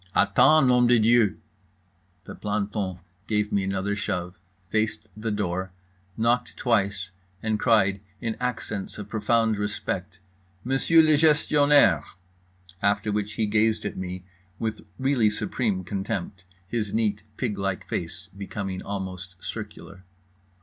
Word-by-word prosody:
"Attends, 135 +3 +5
Nom 125 -1 +5
de 120 0 +6
Dieu." 115 -2 +4 0.9
The - - -9
planton 105 -2 -2 0.3
gave 105 -1 0
me 100 -1 +1
another 95 +1 -1
shove, 90 -3 -3 0.4
faced 110 0 0
the 110 +1 -3
door, 95 -3 -2 0.4
knocked 120 +2 +1
twice, 105 -5 0 0.3
and 110 -1 0
cried 100 -5 +3 0.2
in 115 +1 -2
accents 115 -5 -3
of 105 -1 -7
profound 110 0 +1
respect: 100 -2 -3 0.5
"Monsieur 135 +6 +4
le 155 -1 +5
Gestionnaire"—after 100 - +2
which 105 0 -2
he 110 +1 0
gazed 110 +1 +2
at 105 - -3
me 90 0 -5 0.3
with 110 -1 -3 0.2
really 130 -5 +3
supreme 105 -2 -1
contempt, 95 0 -4 0.2
his 105 -1 -2
neat 105 -2 +1 0.2
pig 110 -6 -2
like 95 -1 -2
face 90 +3 -4
becoming 95 -1 -5
almost 95 -2 -6
circular. 95 -4 -8
105 Hz, 120 wpm, -26 LUFS, 95-115 Hz, 0.9 s, de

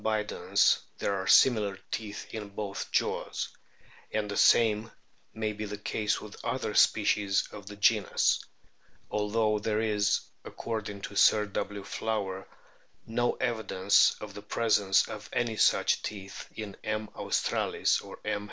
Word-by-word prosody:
bidens 110 -1 +2 0.2
there 100 - 0
are 95 -1 -3
similar 105 -6 +5
teeth 105 -2 -5
in 110 -2 -5
both 100 0 -5
jaws,* - - -1 0.6
and 105 -1 -2
the - - -3
same 110 -1 +4 0.4
may 110 -1 -2
be 105 +1 -5
the 105 0 -5
case 105 +1 -1
with 105 -1 -11
other - - -2
species 100 -2 +3
of 100 -2 -10
the 105 - -8
genus, 105 0 +2 0.7
although 105 0 +1
there 105 +1 -1
is, 105 -2 +2 0.2
according 105 -3 -5
to 100 - -7
Sir 105 +1 +5
W. 100 0 -4
Flower, 100 -2 -3 0.6
"no 120 +2 0
evidence 100 -4 +2
of 105 -1 -8
the 105 - -8
presence 105 -2 +2
of - - -8
any 120 -2 -1
such - - +3
teeth 100 -2 -7
in 105 -3 -6
M, 110 0 -2
australis - - 0
or - - -10
M. 105 - 0
105 Hz, 140 wpm, -29 LUFS, 100-110 Hz, 0.7 s, similar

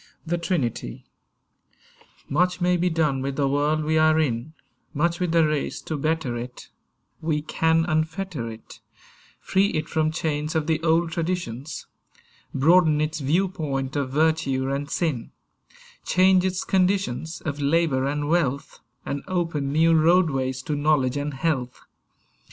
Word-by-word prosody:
THE 170 +1 -1
TRINITY 140 - -2 1.2
MUCH 180 +5 +1
may 180 0 +2
be 180 +1 +1
done 155 -5 0
with 135 0 -3
the 140 -1 +1
world 145 +3 +1
we 155 +1 +2
are 155 0 +4
in, 135 0 -1 0.4
Much 170 +3 +1
with 180 -2 0
the 165 -1 +4
race 150 -2 -2
to 160 - -4
better 155 -4 -1
it; 125 +1 -8 0.5
We 155 -2 -1
can 160 +1 +2
unfetter 155 -5 -2
it, 110 0 -13 0.6
Free 195 +1 +2
it 155 -5 -2
from 155 -2 +1
chains 155 -1 -2
of 160 -2 +1
the 160 0 0
old 165 0 +2
traditions; 160 -6 -3 0.7
Broaden 155 +2 +4
its 155 +1 -1
viewpoint 145 -3 -1
of 140 -2 -1
virtue 140 -3 +1
and 140 +1 -3
sin; 150 -9 -2 0.7
Change 185 0 +4
its 185 -1 -1
conditions 185 -5 0
Of 145 -2 -4
labour 140 -3 +2
and 145 +1 -2
wealth; 145 -4 0 0.3
And 140 0 -3
open 165 -6 -1
new 165 +3 +4
roadways 155 -6 +2
to 150 - -2
knowledge 145 -3 +2
and 145 0 -3
health. 135 -4 -2
155 Hz, 140 wpm, -24 LUFS, 140-165 Hz, 1.2 s, are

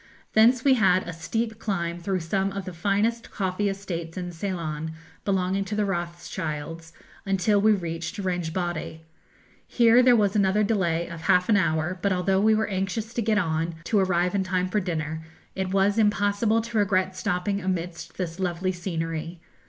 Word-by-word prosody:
Thence 235 +3 +5
we 275 - +6
had 190 -6 +4
a 175 - -4
steep 220 +7 -3
climb 175 -6 -2
through 185 +1 -1
some 195 +4 0
of 195 -1 -5
the 185 - -6
finest 205 +7 0
coffee 195 +1 -1
estates 175 -4 -5
in 180 -1 -4
Ceylon, 160 -3 -4 0.3
belonging 190 0 +1
to 210 - -4
the 210 0 +1
Rothschilds, 165 -3 -4 0.3
until 195 +1 +2
we 215 +1 +5
reached 170 -1 -4
Rangbodde. 175 -3 -3 0.7
Here 235 0 +5
there 250 -1 +6
was 205 -2 +2
another 200 +1 +3
delay 175 -6 0
of 170 -1 -8
half 180 +3 +3
an 215 - +5
hour; 165 0 0
but 200 - +1
although 190 +1 +2
we 220 +1 +4
were 220 0 +1
anxious 195 +3 -3
to 240 - -1
get 220 -1 +1
on, 165 -2 0
to 205 +4 +2
arrive 180 -1 +1
in 200 -1 +1
time 185 0 -1
for 210 - +1
dinner, 160 -4 -3 0.3
it 190 -1 -2
was 195 +2 +2
impossible 210 +1 +2
to 230 -1 -2
regret 190 -2 +1
stopping 185 +2 -1
amidst 180 -1 -4
this 175 -1 -4
lovely 185 0 -1
scenery. 165 -2 -4
185 Hz, 170 wpm, -25 LUFS, 170-205 Hz, 0.7 s, we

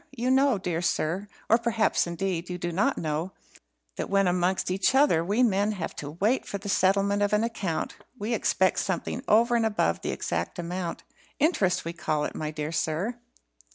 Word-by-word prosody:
You 245 +2 +1
know, 265 -3 +4
dear 175 -3 -2
sir, 175 +3 -1 0.2
or 230 - +5
perhaps, 230 -5 +1
indeed, 170 0 -3
you 180 - -3
do 175 0 -3
not 210 +11 +1
know, 160 +3 -2 0.6
that - - -3
when 195 -1 +3
amongst 180 +1 +1
each 190 +7 +2
other 265 - +4
we 205 +8 +2
men 205 -2 +2
have 175 -5 -5
to 145 - -5
wait 225 +7 +2
for 200 - -3
the 200 +1 -7
settlement 200 +2 +2
of 205 0 +1
an 210 +1 +3
account, 205 -8 -3 0.2
we 225 +1 -2
expect 190 -4 +2
something 190 -3 -2
over 235 +3 +4
and 230 - +2
above 205 - +1
the - - -3
exact 85 0 -3
amount. 175 0 -4 0.3
Interest 200 - +2
we 170 - -3
call 155 -3 -1
it, - - -4
my 155 - -3
dear 150 0 -4
sir." 170 +9 -1
190 Hz, 190 wpm, -27 LUFS, 170-220 Hz, 0.6 s, or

